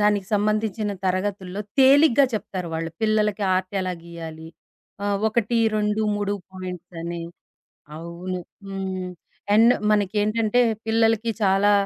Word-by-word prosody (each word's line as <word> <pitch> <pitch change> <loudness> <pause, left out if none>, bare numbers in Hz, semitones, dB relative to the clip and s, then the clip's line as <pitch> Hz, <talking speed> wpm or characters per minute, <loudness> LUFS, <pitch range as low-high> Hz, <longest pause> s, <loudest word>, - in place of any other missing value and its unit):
దానికి 205 -2 +2
సంబంధించిన 215 0 0
తరగతుల్లో 190 +1 -2 0.2
తేలిగ్గా 275 0 +6
చెప్తారు 185 -4 -4
వాళ్ళు. 165 0 -3
పిల్లలకి 215 -1 +1
ఆర్ట్ 185 +1 -2
ఎలా 185 -1 -2
గీయాలి, 160 -1 -8 0.6
ఆహ్, 200 -1 +1
ఒకటి, 230 +1 0 0.2
రెండు, 210 +1 +1
మూడు 205 0 -1 0.2
పాయింట్స్ 180 -1 -7
అని. 170 0 -4 0.7
అవును. 170 +3 -5 0.3
హ్మ్. 190 -1 -4 0.4
అండ్ 230 +3 +7 0.2
మనకేంటంటే, 215 +3 +2 0.2
పిల్లలకి 225 0 +2
చాలా 195 +1 +4
205 Hz, 110 wpm, -23 LUFS, 185-215 Hz, 0.7 s, అండ్